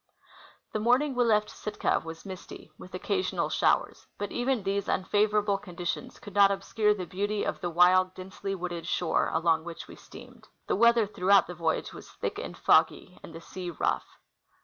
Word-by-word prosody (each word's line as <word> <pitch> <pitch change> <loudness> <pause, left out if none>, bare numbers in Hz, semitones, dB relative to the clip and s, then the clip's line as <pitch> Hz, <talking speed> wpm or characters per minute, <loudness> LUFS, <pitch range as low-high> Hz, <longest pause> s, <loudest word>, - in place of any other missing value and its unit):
The 215 - -1
morning 250 +6 +2
we 250 -1 +2
left 210 -2 +2
Sitka 210 - -1
was 165 +2 -9
misty, 190 -2 -10
with - - -11
occasional 385 -1 -1
showers; - - +1
but 205 - -4
even 245 -2 0
these 200 +1 -1
unfavorable 205 +1 +1
conditions 180 +6 -5
could 205 -5 -12
not 200 -1 +6
obscure 210 +1 +1
the 185 -3 -5
beauty 205 +3 -2
of - - -3
the 175 - -2
wild, 185 +2 +4
densely 190 +1 -5
wooded 175 -2 -5
shore 175 -1 +1
along 160 0 +2
which 170 0 -8
we - - -11
steamed. - - -14 0.2
The - - 0
weather 235 -1 +5
throughout 195 -1 +3
the 180 - -7
voyage 165 -2 -2
was - - -11
thick - - -4
and - - -7
foggy 180 - +2
and - - -11
the 165 +1 -10
sea 180 +1 -7
rough. 170 - -1
195 Hz, 175 wpm, -28 LUFS, 175-210 Hz, 0.2 s, not